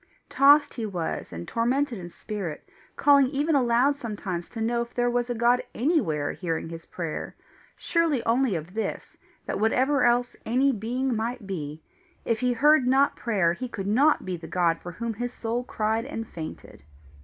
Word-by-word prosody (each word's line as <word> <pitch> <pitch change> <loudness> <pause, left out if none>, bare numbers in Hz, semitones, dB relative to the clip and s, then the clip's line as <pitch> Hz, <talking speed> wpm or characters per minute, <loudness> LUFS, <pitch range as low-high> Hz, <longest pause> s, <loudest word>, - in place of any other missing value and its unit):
Tossed 285 +2 +5
he 230 -4 -4
was 175 -5 -4
and 85 0 -7
tormented 245 0 0
in 175 -1 -8
spirit, 190 -4 -6 0.3
calling 280 -2 +5
even 290 +4 0
aloud 255 +1 +3
sometimes 205 -9 -5
to 230 - -8
know 235 +1 0
if 235 0 -7
there 245 0 +1
was 245 0 0
a 245 - -1
God 240 +2 +3
anywhere 220 - +1
hearing 165 -3 -3
his 165 0 -9
prayer, 165 -3 -5 0.4
sure 335 -5 +1
only 240 -2 +2
of 165 +2 -6
this, 220 +1 -4 0.3
that - - -3
whatever 255 +6 +2
else 245 0 +2
any 260 +4 +2
being 245 +3 -1
might 230 +1 -3
be, 155 -5 -5 0.4
if 230 -1 0
he 250 -1 +1
heard 295 +1 +4
not 270 +2 +3
prayer, 190 -8 +1
he 250 +8 -5
could 195 -4 -5
not 270 +10 +3
be 185 -1 -2
the 165 -1 -9
God 170 -1 +1
for 175 - -8
whom 235 +4 -3
his 245 +3 -4
soul 235 +2 -2
cried 220 -1 -1
and 225 0 -5
fainted. 155 - -9
235 Hz, 180 wpm, -26 LUFS, 185-255 Hz, 0.4 s, Tossed